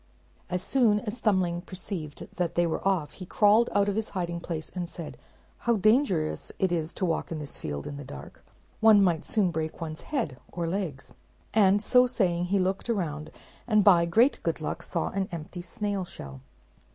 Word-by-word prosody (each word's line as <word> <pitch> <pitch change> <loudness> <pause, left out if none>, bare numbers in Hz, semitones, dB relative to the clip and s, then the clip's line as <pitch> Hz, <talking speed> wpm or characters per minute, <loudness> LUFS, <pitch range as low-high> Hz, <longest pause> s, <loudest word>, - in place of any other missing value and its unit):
As 180 0 -2
soon 230 -6 +3
as 230 +1 -5
Thumbling 185 -6 +1
perceived 175 -5 -6
that 175 -2 -1
they 175 - +3
were 165 - -1
off, 170 -7 +1
he 185 - -9
crawled 215 +4 +4
out 205 0 +2
of 200 - 0
his 220 0 -2
hiding 170 -1 -2
place, 165 -2 -5
and 175 -2 -4
said, 170 -3 -8 0.4
"How 235 0 +2
dangerous 215 - +2
it 190 -2 +1
is 165 -2 -1
to 185 - -1
walk 165 -1 -1
in 165 - -2
this 150 -2 -5
field 70 -1 -4
in 140 - -6
the 145 - -7
dark: 135 - -11 0.4
one 220 -2 +7
might 170 -3 +1
soon 195 -5 +2
break 160 -1 -3
one's 155 -1 -5
head 225 - -3
or 175 -1 -3
legs;" 165 -7 -4 0.4
and 205 -1 +4
so 250 +3 +5
saying 180 -8 +1
he 195 +3 +1
looked 190 +4 -1
around, 155 -8 -2 0.4
and 215 -3 +4
by 175 -4 +6
great 230 +11 +3
good - - -1
luck - - -4
saw - - -2
an 195 -1 -2
empty 170 +1 -6
snail 200 +1 -2
shell. 70 - -9
180 Hz, 190 wpm, -28 LUFS, 165-205 Hz, 0.4 s, one